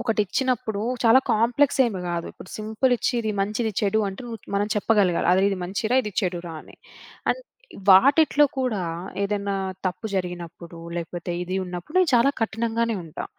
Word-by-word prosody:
ఒకటిచ్చినప్పుడు, 225 -1 0 0.2
చాలా 235 +4 +7
కాంప్లెక్సేమి 235 -2 +2
కాదు. 170 -1 -2
ఇప్పుడు 185 - -13
సింపులిచ్చి 220 +4 0
ఇది 220 - -2
మంచి, 210 +2 -1
ఇది 220 - -1
చెడు 215 +1 +2
అంటు 195 +5 -7 0.3
మనం 205 +1 +1
చెప్పగలగాల. 205 -4 +2
అది 190 +1 +3
ఇది 195 - -2
మంచి 200 +5 -4
రా, - - +4
ఇది 210 -3 -5
చెడురా 175 -3 -3
అని. - - -17 0.5
అన్ - - -2 0.5
వాటిట్లో 285 +8 +6
కూడా 240 -8 0 0.4
ఏదన్నా 200 -1 -1 0.3
తప్పు 185 +5 -3
జరిగినప్పుడు, 175 -2 -5 0.2
లేకపోతే 175 +1 -4
ఇది 185 +2 -3
ఉన్నప్పుడు 180 - -6
నేను 365 -3 +3
చాలా 240 +3 +5
కఠినంగానే 230 0 -1
ఉంటా. 155 - -6
210 Hz, 150 wpm, -24 LUFS, 185-235 Hz, 0.5 s, చాలా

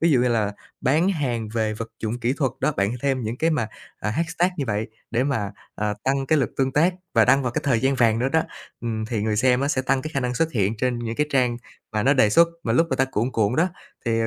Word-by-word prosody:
ví 165 0 +3
dụ 130 - +4
như 125 - +2
là 105 -3 +1 0.3
bán 155 +8 +2
hàng 125 - -1
về 110 -1 0
vật 115 +1 -5
dụng 115 +2 -2
kỹ 120 +2 +1
thuật 135 -5 0
đó, 155 - +2
bạn 100 +2 +1
thêm 135 -2 +1
những 110 +2 -3
cái 165 +4 +1
mà, 115 -9 0 0.3
à, 105 - -1
hashtag 165 +6 0
như 145 - -1
vậy 105 0 -1 0.2
để 120 +3 +1
mà, 115 -8 -1 0.2
ờ, 105 0 -1
tăng 135 0 +1
cái 155 +3 +3
lượt 135 - 0
tương 135 -1 +1
tác 170 +5 +3 0.2
và 115 -2 +6
đăng 135 +1 +4
vào 125 - -1
cái - - -1
thời 125 -5 +2
gian 135 +1 +2
vàng 115 -3 +3
nữa 130 +2 +1
đó. 160 +3 +2 0.4
Ừm, 110 -2 -2
thì 110 -3 -2
người 110 -1 0
xem 125 +2 +3
á 140 - 0
sẽ 130 - 0
tăng 130 0 +1
cái 155 - -5
khả 135 - +1
năng 125 -1 -1
xuất 165 +3 0
hiện 105 0 +1
trên 125 +1 0
những 115 -1 -4
cái 150 - +1
trang 125 -3 +2 0.4
mà 105 0 0
nó 140 +3 +4
đề 110 -6 +4
xuất 170 +7 +6
mà 115 - 0
lúc 165 +7 +4
mà - - +1
ta 135 - +3
cuộn 120 +5 0
cuộn 110 +1 +1
đó 175 +3 +3 0.4
thì, 115 -1 +1
à, 115 - +1
125 Hz, 280 wpm, -23 LUFS, 110-140 Hz, 0.4 s, và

